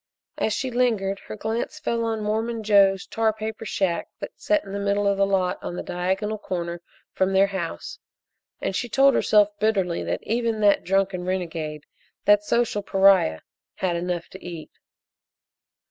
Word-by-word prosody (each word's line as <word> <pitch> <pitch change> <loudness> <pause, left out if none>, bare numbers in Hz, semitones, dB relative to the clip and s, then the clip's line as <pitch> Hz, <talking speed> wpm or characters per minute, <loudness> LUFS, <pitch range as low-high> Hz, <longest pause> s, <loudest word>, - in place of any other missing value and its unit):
As 220 - +1
she 260 +4 -2
lingered 220 -6 +1
her - - -6
glance 220 +2 -3
fell 230 0 -1
on 225 -1 -2
Mormon 220 +2 -1
Joe's 200 -2 +4
tar 225 -1 +1
paper 220 +1 -6
shack 185 -4 -1
that - - -6
set 310 -1 +1
in 195 - -9
the 200 - -2
middle 200 0 0
of 200 0 +3
the 195 0 +2
lot 190 -2 0
on 175 - -5
the - - -4
diagonal 190 +4 -2
corner 170 -3 -4 0.3
from 190 0 +1
their 190 +1 +5
house, 190 - -5 0.6
and 195 - -2
she 240 +5 -2
told 275 +4 +5
herself 210 -3 +4
bitterly 195 -5 +1
that - - -3
even 230 -1 -1
that 205 -1 +4
drunken 195 -1 0
renegade, 165 -5 -3 0.4
that 205 0 +5
social 230 -1 0
pariah, 195 - +4 0.3
had 180 -2 -1
enough 175 0 -3
to 190 - -12
eat. 170 -3 -8
200 Hz, 165 wpm, -24 LUFS, 185-220 Hz, 0.6 s, their